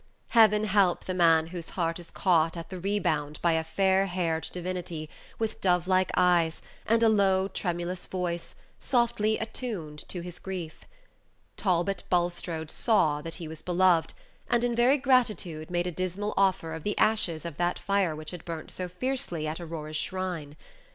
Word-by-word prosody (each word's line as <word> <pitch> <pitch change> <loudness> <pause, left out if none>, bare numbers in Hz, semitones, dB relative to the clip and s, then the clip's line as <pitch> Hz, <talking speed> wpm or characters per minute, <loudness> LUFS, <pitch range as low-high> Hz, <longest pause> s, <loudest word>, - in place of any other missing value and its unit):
Heaven 215 -2 +5
help 195 -4 +2
the 185 - -2
man 165 -3 +4
whose 170 -2 -5
heart 165 -1 -1
is 170 - -11
caught 165 -3 +2
at 165 - -7
the 185 - -5
rebound 155 -7 -1
by 170 - +4
a 160 0 +1
fair 190 +3 +2
haired 170 -3 -1
divinity, 175 -3 -5 0.3
with 225 -1 -3
dove 180 -2 +2
like 185 0 +3
eyes, 175 -3 +3 0.3
and 230 +1 +3
a - - +6
low, 195 -3 +3
tremulous 175 -1 -3
voice, 175 -2 -3 0.2
softly 235 -4 +1
attuned 215 -9 -5
to 180 - -4
his 175 0 -8
grief. 180 -4 -6 0.7
Talbot 185 0 0
Bulstrode 175 -3 -1
saw 155 -10 +2
that 165 +2 -6
he 165 - -7
was 160 0 -8
beloved, 180 -2 +2 0.3
and 240 -1 +2
in 240 -1 +1
very 245 +4 +4
gratitude 220 - +1
made 175 0 0
a 180 - -2
dismal 185 +4 -3
offer 190 -4 +2
of 160 - -5
the 205 +6 -2
ashes 180 -7 +2
of 170 -4 -6
that 175 0 0
fire 190 -3 +1
which 155 0 -7
had 180 -2 -8
burnt 165 -2 -6
so 185 - -4
fiercely 180 - -2
at 155 +2 -3
Aurora's 155 -2 -5
shrine. 175 -4 -3
180 Hz, 170 wpm, -28 LUFS, 165-200 Hz, 0.7 s, a